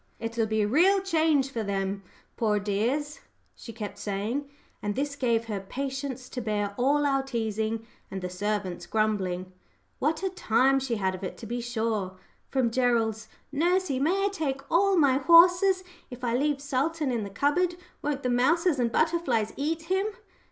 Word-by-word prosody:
"It'll 230 -1 -1
be 220 0 +1
a - - +1
real 360 - +4
change 315 -7 +2
for 230 - -2
them, 195 -1 -2 0.3
poor 215 -2 +1
dears," 240 +9 -1 0.4
she 230 - -10
kept 210 -3 -7
saying; 210 +8 -3 0.3
and 205 -1 -2
this 285 +1 -2
gave 235 -4 +1
her 210 -3 -3
patience 265 +4 -5
to 250 - -4
bear 205 -2 -1
all 285 +5 +2
our 275 -1 +2
teasing 225 -3 -2 0.2
and 190 - -5
the - - -1
servants' 195 0 -3
grumbling. 190 -4 -1 0.5
What 310 +6 0
a 380 - 0
time 270 -5 +3
she 260 -3 -2
had 190 -3 0
of 185 +1 -8
it, 185 - -5
to - - -9
be 240 +2 -3
sure! 220 -5 -2 0.3
From 255 -4 +1
Gerald's 230 -3 +1 0.2
"Nursey, 345 -1 +1
may 370 +8 +2
I - - +2
take 280 -8 -2
all 385 +3 +4
my 275 -4 +4
horses? 355 +5 +6 0.3
If 250 -1 -10
I 235 -1 +1
leave 285 +1 +1
Sultan 285 +1 -1
in 235 -3 -1
the 200 - -5
cupboard 295 - +1 0.3
won't 285 -1 -2
the 250 - 0
mouses 300 +5 +3
and 235 -2 +1
butterflies 270 -9 +1
eat 320 +3 -2
him?" 380 +4 0
255 Hz, 175 wpm, -27 LUFS, 215-295 Hz, 0.5 s, horses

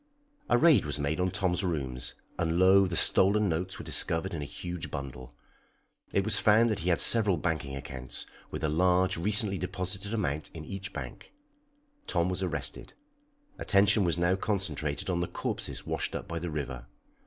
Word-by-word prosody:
A - - +5
raid 160 - +5
was 75 -1 -3
made 75 +3 -2
on 90 +1 +1
Tom's 95 0 -1
rooms, 65 -8 -2 0.2
and 85 -1 0
lo! 95 +1 +6
the 90 - -3
stolen 100 +5 +3
notes 90 +2 -2
were - - -8
discovered 80 +1 +2
in 80 - -4
a - - -4
huge 85 +3 -6
bundle. 65 -4 -7 0.8
It 100 - +1
was 110 - +3
found 110 +2 +4
that 105 - -1
he 85 - -1
had 85 - +2
several 105 -6 +6
banking 80 -3 -2
accounts, 65 -2 -6 0.2
with - - -6
a - - +2
large, 90 +4 +2
recently 100 +2 +3
deposited 95 +2 -4
amount 80 -10 -2
in 80 -1 -7
each 95 +2 -6
bank. 65 -5 -8 0.8
Tom 85 0 +1
was 90 +1 -2
arrested. 80 -6 -3 0.6
Attention 100 +1 +4
was 85 -2 +1
now 85 +2 +2
concentrated 90 -8 -2
on 90 -2 0
the 85 - -1
corpses - - -4
washed - - -3
up - - -5
by 85 -1 -4
the 85 +1 -4
river. 65 -5 -5
90 Hz, 175 wpm, -29 LUFS, 75-95 Hz, 0.8 s, lo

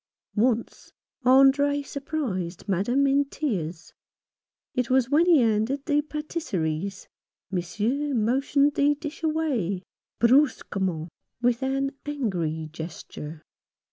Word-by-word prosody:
Once 230 +1 0 0.3
Andre 275 +2 +5
surprised 255 - -4
Madame 210 +9 +2
in 275 +1 +4
tears. 180 - -4 0.8
It 250 -2 -1
was 260 0 +2
when 325 +4 +4
he 330 -6 +6
handed 230 +5 +1
the 295 0 +2
pattiseries, 200 - -3 0.4
Monsieur 220 +11 -1
motioned 275 +5 +2
the 290 +1 +3
dish 300 +1 -7
away 275 - 0 0.2
— - - -61
brusquement, 195 - +2 0.3
with 245 0 +1
an 270 +1 0 0.2
angry 175 - -2
gesture. 160 -1 -8
255 Hz, 105 wpm, -26 LUFS, 190-285 Hz, 0.8 s, he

